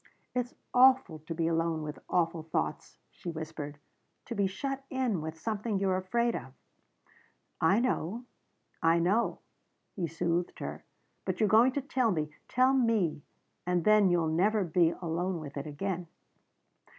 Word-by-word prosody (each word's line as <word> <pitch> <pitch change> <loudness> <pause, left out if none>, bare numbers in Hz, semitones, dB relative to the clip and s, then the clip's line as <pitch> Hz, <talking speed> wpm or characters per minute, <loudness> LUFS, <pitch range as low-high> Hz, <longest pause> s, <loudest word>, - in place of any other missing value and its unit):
"It's 250 -1 -2 0.2
awful 255 -10 +5
to 155 +2 -6
be 165 0 0
alone 165 -1 0
with 150 0 -6
awful 165 -2 +1
thoughts," 160 +1 -3
she 175 - -7
whispered. 155 -3 -6 0.5
"To 235 - -5
be 200 -3 +1
shut 270 +8 -4
in 250 -10 0
with 160 +1 -5
something 215 +3 -2
you're 190 -1 +1
afraid 235 +6 0
of." 130 +1 -7 1.1
"I 190 +7 +4
know 235 -2 -1 0.6
I 165 +1 +4
know," 190 +8 +1 0.5
he 180 -4 -1
soothed 170 +2 -1
her. - - -6 0.4
"But - - -3
you're 215 - +4
going 235 +5 +6
to 280 - -1
tell 255 -3 +1
me. 155 -6 -1 0.2
Tell 255 +2 +3
me. 225 - +2 0.5
And 180 -1 +1
then 215 -2 +6
you'll 175 -2 +2
never 200 +6 +2
be 170 -1 +3
alone 175 +1 -2
with 145 -2 -8
it 140 +1 -4
again." 175 +3 -3
180 Hz, 150 wpm, -30 LUFS, 165-225 Hz, 1.1 s, going